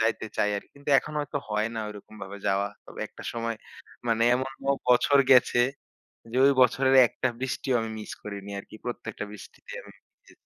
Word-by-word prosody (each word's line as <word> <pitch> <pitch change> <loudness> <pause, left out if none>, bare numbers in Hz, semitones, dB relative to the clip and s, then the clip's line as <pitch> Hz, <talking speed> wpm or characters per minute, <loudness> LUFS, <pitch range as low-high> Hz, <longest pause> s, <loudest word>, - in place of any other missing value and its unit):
যাইতে 110 0 +1
চাই 105 - +2
আরকি। - - -8
কিন্তু 140 +1 -5
এখন 150 - -5
হয়তো 145 0 -3
হয় 105 +1 0
না 110 - -2
ঐরকম 105 +1 -11
ভাবে 100 +1 -7
যাওয়া। 100 +1 +2 0.2
তবে - - -10
একটা - - -12
সময় 115 -1 -2 0.5
মানে 115 0 +2
এমনও 135 +2 -1 0.2
বছর 125 +3 +5
গেছে। 125 -1 +6 0.7
যে - - -2
ওই 140 - +6
বছরের 130 +2 +4
একটা 130 - -1
বৃষ্টিও 130 0 -1
আমি 115 - -3
মিস 105 - -7
করিনি 100 -1 -7
আরকি। 105 - -10
প্রত্যেকটা 110 -3 -5
বৃষ্টিতে 105 - -12
আমি - - -14 0.3
জি। - - -18
115 Hz, 180 wpm, -27 LUFS, 105-130 Hz, 0.7 s, গেছে